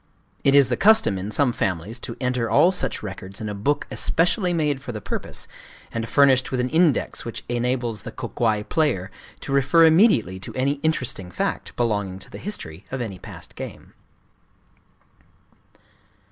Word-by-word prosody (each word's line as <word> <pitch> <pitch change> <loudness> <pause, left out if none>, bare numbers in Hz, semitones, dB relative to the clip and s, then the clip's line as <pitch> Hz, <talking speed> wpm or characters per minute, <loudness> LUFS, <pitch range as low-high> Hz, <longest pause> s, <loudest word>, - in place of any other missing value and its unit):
It 140 - +4
is 140 -2 +6
the - - 0
custom 220 - +4
In 95 +3 -4
some 125 +3 +1
families 100 +1 -2
to 115 - -7
enter 125 -3 -1
all 180 - +5
such 135 - -2
records 95 -1 -8
in 110 - -4
a - - -3
book 140 +9 0
especially 180 +3 +1
made 150 -5 0
for 130 - -6
the 110 - -5
purpose, - - -4 0.4
and 115 0 -4
furnished 135 -2 +4
with 130 - -2
an 125 +1 0
index 160 -3 +2
which 115 - -7
enables 120 -2 -1
the 115 +1 -7
Kō - - -7
kwai 110 -3 +1
player 125 - 0 0.3
to - - -6
refer 145 +5 +5
immediately 160 - +4
to 100 - -8
any 140 +2 0
interesting 130 - -1
fact 90 - -3
belonging 105 -6 -1
to 95 - -11
the - - -8
history 95 - -6
of 130 - -4
any 105 -6 -5
past - - -11
game. - - -9
125 Hz, 170 wpm, -23 LUFS, 105-145 Hz, 0.4 s, is